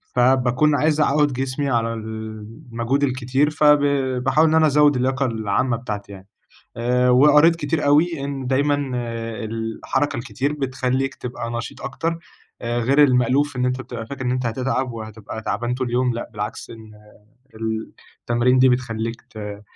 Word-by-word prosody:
فباكون 130 +3 +3
عايز 150 +1 +2
أعوّد 145 -1 +2
جسمي 135 +2 -2
على 115 -2 0
المجهود 115 +4 -4
الكتير، 130 +2 +1
ف 150 0 -3
ب 150 0 +7 0.4
باحاول 155 +5 +4
إن 160 - +2
أنا 160 -1 +5
أزود 145 -1 +4
اللياقة 130 +2 0
العامة 115 +1 0
بتاعتي 105 -4 -6
يعني. 95 0 -12 0.5
آآ 125 +1 +2
وقريت 150 +6 +6
كتير 150 -1 -1
أوي 150 0 +3
إن 135 -2 -4
دايمًا 140 +1 +1 0.5
الحركة 115 +5 -2
الكتير 135 +3 -2
بتخلّيك 135 -1 -1
تبقى 120 -2 -6
نشيط 115 -1 -5
أكتر. 165 +4 -3 0.4
آآ 120 0 -1
غير 135 +5 +4
المألوف 130 +1 +2
إن 125 - 0
أنت 125 +1 -1
بتبقى 115 -3 -7
فاكر 130 0 -6
إن 125 - 0
أنت 125 -1 -1
هتتعب، 130 +1 -1
وهتبقى 110 -1 -8
تعبان 120 +2 -2
طول 130 0 -2
اليوم، 125 0 0
لأ، 120 - -6
بالعكس، 105 -1 -6
إن 110 -1 -12 0.7
ال 110 0 -4 0.3
التمارين 125 +2 +2
دي 130 - +6
بتخلّيك 115 -2 -2
ت 105 -1 -8
125 Hz, 155 wpm, -21 LUFS, 115-140 Hz, 0.7 s, ب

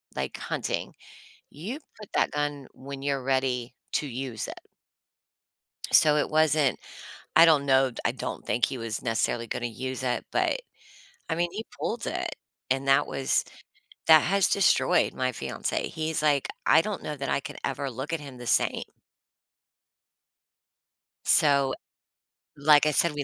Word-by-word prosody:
like, 65 -1 -3
hunting, - - -3 0.6
you 205 - -6 0.2
put 210 -2 -11
that - - +2
gun 145 -1 -3
when 135 0 -9
you're 140 -1 -1
ready 130 -2 -1 0.2
to 150 - 0
use 125 -3 -4
it. - - -10 1.3
So, 150 -1 +6
it 150 - 0
wasn't 155 -3 +3 0.6
I - - +9
don't 155 -4 +4
know, 135 -1 +4
d 120 - -8
I - - +2
don't - - -6
think 120 +2 +1
he 130 - -5
was 115 -2 -4
necessarily 115 0 0
gonna 120 - -3
use 130 +2 -5
it, 125 -1 -1
but, - - +1 0.7
I - - 0
mean, 175 +1 0
he 215 +3 -5 0.2
pulled - - -3
it, - - -3 0.4
and 135 +1 0
that 135 +1 +4
was 135 0 0 0.6
that 160 -1 +9
has 190 +3 +2
destroyed 170 -9 +3
my 130 0 -1
fiance, - - -3
he's, 160 0 -2
like, 145 -3 +2 0.2
"I 160 - +6
don't 210 +1 -4
know 150 - -4
that 140 -1 -4
I - - +1
could - - -8
ever 140 -1 -2
look 130 +6 -6
at 165 - -1
him 140 -3 -10
the 120 - -8
same." - - +2 2.4
So, 140 -3 +4 0.8
like 145 0 +5
I 150 - +3
said, 165 +2 +3
we 145 -1 -3
140 Hz, 160 wpm, -27 LUFS, 130-155 Hz, 2.4 s, I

